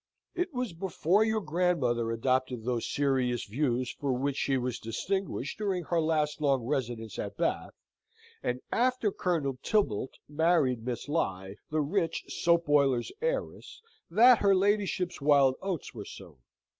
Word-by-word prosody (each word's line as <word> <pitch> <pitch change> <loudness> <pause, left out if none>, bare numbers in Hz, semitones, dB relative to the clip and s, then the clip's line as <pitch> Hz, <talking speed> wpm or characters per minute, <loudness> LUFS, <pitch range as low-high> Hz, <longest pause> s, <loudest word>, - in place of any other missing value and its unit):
It 360 0 -2
was 250 - -3
before 180 +3 +1
your 220 0 0
grandmother 150 - 0
adopted 130 0 0
those 120 -2 -1
serious 130 -4 0
views 125 +1 -1
for 140 -2 -3
which 135 +2 -1
she 135 -1 +1
was 125 -1 -3
distinguished 160 - -3
during 195 -4 -1
her 170 +1 0
last 155 -1 0
long 135 -4 +2
residence 120 -5 -3
at - - -5
Bath, - - -1 0.7
and 125 +1 -2
after 250 -3 +1
Colonel 150 -9 -1
Tibbalt 135 - 0
married 150 -6 +2
Miss 125 +2 -4
Lye, 95 - -2
the 155 0 0
rich 165 +3 -1
soap 170 0 +2
boiler's 140 -4 +2
heiress, 485 +1 -3 0.3
that 235 +7 +6
her 200 -1 +4
ladyship's 190 -3 0
wild 140 -2 +5
oats 190 -5 -4
were 105 -4 -7
sown. 80 -5 -11
145 Hz, 145 wpm, -29 LUFS, 125-185 Hz, 0.7 s, that